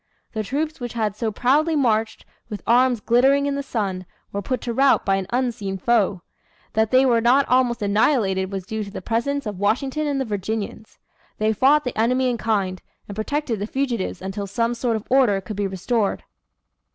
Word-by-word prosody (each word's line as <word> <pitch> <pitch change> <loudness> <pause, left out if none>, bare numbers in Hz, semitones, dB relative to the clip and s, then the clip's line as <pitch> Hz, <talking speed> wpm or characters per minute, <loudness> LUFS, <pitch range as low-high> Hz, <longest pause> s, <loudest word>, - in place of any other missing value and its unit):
The 220 - -2
troops 300 +8 -3
which 240 -2 -5
had 215 -3 -1
so 220 0 -2
proudly 295 +9 +2
marched, 225 -5 0 0.2
with 210 -3 -6
arms 245 -1 +3
glittering 265 +5 +3
in 285 - 0
the 280 - -2
sun, 195 -9 -3 0.2
were 200 - -3
put 255 +6 -2
to 235 - -3
rout 270 +3 +3
by 195 0 +2
an 190 -1 -4
unseen 240 -6 -2
foe. 200 -4 +1 0.5
That 220 0 +2
they 260 +2 +5
were 235 -3 +3
not 255 +4 +4
almost 250 -3 +2
annihilated 200 -3 +1
was 195 -2 -4
due 220 +2 -3
to 200 - -8
the 200 - -8
presence 275 +5 -1
of 205 -3 -5
Washington 265 +9 0
and 280 -2 -1
the 265 - -1
Virginians. 215 +1 -4 0.4
They 215 +1 +1
fought 285 +7 +4
the 250 - -4
enemy 250 +3 +2
in 235 - -3
kind, 195 -5 -1 0.3
and 200 - -7
protected 235 +1 -2
the 205 - -3
fugitives 240 -8 -2
until 195 +1 -4
some 230 +4 0
sort 235 -1 -1
of 220 - -5
order 250 -7 +4
could 195 +2 -7
be 200 0 -1
restored. 200 +3 -1
230 Hz, 195 wpm, -22 LUFS, 205-260 Hz, 0.5 s, they